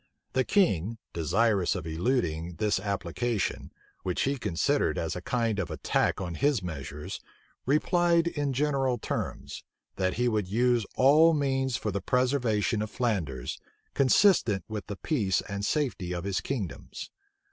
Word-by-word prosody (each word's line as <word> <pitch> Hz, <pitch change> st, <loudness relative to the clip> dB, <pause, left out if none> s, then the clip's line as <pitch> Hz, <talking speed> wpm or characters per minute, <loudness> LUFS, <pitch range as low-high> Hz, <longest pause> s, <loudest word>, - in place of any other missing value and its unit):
The 130 Hz, 0 st, +2 dB
king, 115 Hz, -, +2 dB, 0.2 s
desirous 95 Hz, +3 st, +2 dB
of 90 Hz, -, -4 dB
eluding 85 Hz, -2 st, -1 dB
this 105 Hz, -1 st, +1 dB
application, 100 Hz, +3 st, -2 dB, 0.3 s
which 90 Hz, -2 st, -1 dB
he 140 Hz, 0 st, 0 dB
considered 90 Hz, -7 st, +1 dB
as 80 Hz, -, -2 dB
a 90 Hz, -, -5 dB
kind 115 Hz, 0 st, 0 dB
of 90 Hz, -4 st, -2 dB
attack 80 Hz, -, 0 dB
on 90 Hz, -3 st, -4 dB
his 130 Hz, -, +1 dB
measures, 75 Hz, -3 st, -6 dB, 0.5 s
replied 170 Hz, +3 st, +3 dB
in 145 Hz, -4 st, -1 dB
general 135 Hz, -2 st, +1 dB
terms, -, -, -4 dB, 0.3 s
that 95 Hz, -1 st, 0 dB
he 125 Hz, +1 st, +1 dB
would 105 Hz, -5 st, 0 dB
use 120 Hz, +2 st, +2 dB
all 155 Hz, +5 st, +6 dB
means 135 Hz, -3 st, 0 dB
for 105 Hz, -, -3 dB
the 100 Hz, 0 st, -2 dB
preservation 125 Hz, -2 st, +1 dB
of 110 Hz, -, -3 dB
Flanders, 85 Hz, -, -2 dB, 0.3 s
consistent 130 Hz, -, +4 dB
with 110 Hz, -2 st, -5 dB
the 100 Hz, -, -4 dB
peace 100 Hz, -, 0 dB
and 100 Hz, 0 st, -5 dB
safety 110 Hz, -, -1 dB
of 85 Hz, -1 st, -4 dB
his 100 Hz, -1 st, -1 dB
kingdoms. 115 Hz, -10 st, -5 dB
110 Hz, 145 wpm, -28 LUFS, 90-130 Hz, 0.5 s, all